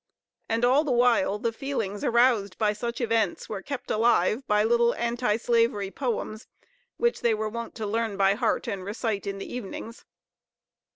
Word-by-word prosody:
And, 230 +2 +2
all 265 +5 +4
the 295 - -2
while, 240 -5 +3
the 230 +2 -2
feelings 225 -7 -3
aroused 235 -5 +3
by 210 -2 +2
such 235 +3 -4
events 230 -2 0
were 205 -3 -5
kept 280 +4 -5
alive 225 +1 +2
by 210 0 +3
little 235 +1 +3
Anti 235 -2 0
slavery 230 -4 +1
poems, 230 -4 -3 0.5
which 475 0 +1
they 235 -2 +2
were 215 0 -2
wont 235 +1 -6
to 220 - -4
learn 220 -1 -1
by 195 0 +4
heart 225 +1 0
and 195 -2 -3
recite 210 0 -3
in 195 0 -3
the 195 - -7
evenings. 230 0 -7
230 Hz, 170 wpm, -26 LUFS, 210-240 Hz, 0.5 s, all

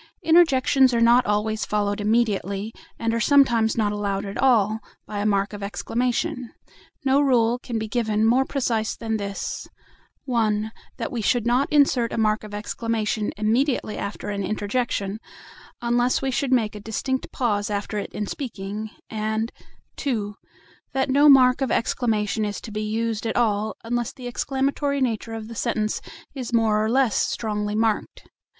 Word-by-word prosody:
Interjections 270 -6 +4
are - - +2
not 235 +2 +5
always 210 +1 0
followed 205 -1 -1
immediately, 210 -1 0 0.2
and 230 0 -1
are 230 - 0
sometimes 235 -5 +4
not 210 -2 +2
allowed 200 -1 -2
at 200 0 -6
all, 220 -5 +3 0.3
by 205 - -5
a 205 - +1
mark 200 0 +1
of 205 - -7
exclamation. 240 +4 -2 0.6
No 270 +1 +4
rule 245 -3 +3
can 240 -2 -4
be 220 0 -3
given 220 -2 0
more 245 +4 +4
precise 235 -6 -1
than 225 -1 -2
this: 200 -1 -4 0.6
(1) 220 -4 0 0.3
That - - -4
we 235 - -2
should 235 +2 +1
not 245 +4 +2
insert 275 -5 +3
a - - -3
mark 215 -1 +1
of 210 - -9
exclamation 215 0 -2
immediately 225 +1 +1
after 200 0 -5
an 200 -1 -2
interjection, 205 0 -2 0.6
unless 240 +1 +2
we 270 -1 -1
should 265 +1 -1
make 225 -4 +2
a 210 - -7
distinct 260 +5 -3
pause 210 -5 0
after 205 +1 -2
it - - -6
in 210 - -3
speaking; 215 -3 -5 0.2
and 220 +1 -2 0.5
(2) 215 -7 -2 0.6
that 265 0 0
no 290 +2 +6
mark 255 -1 +6
of 265 - +1
exclamation 220 -3 0
is 205 -1 -3
to 225 - -8
be 210 0 -3
used 225 +1 -2
at 225 - -2
all, 215 -2 +1
unless 240 0 -2
the 255 - -11
exclamatory 275 +3 -1
nature 225 -3 -1
of 220 -1 -6
the 230 - -8
sentence 215 -2 -1 0.3
is 255 -4 -5
more 220 -2 +3
or 220 - 0
less 255 -2 +2
strongly 210 -2 -1
marked. 220 -1 -1
225 Hz, 165 wpm, -24 LUFS, 210-250 Hz, 0.6 s, no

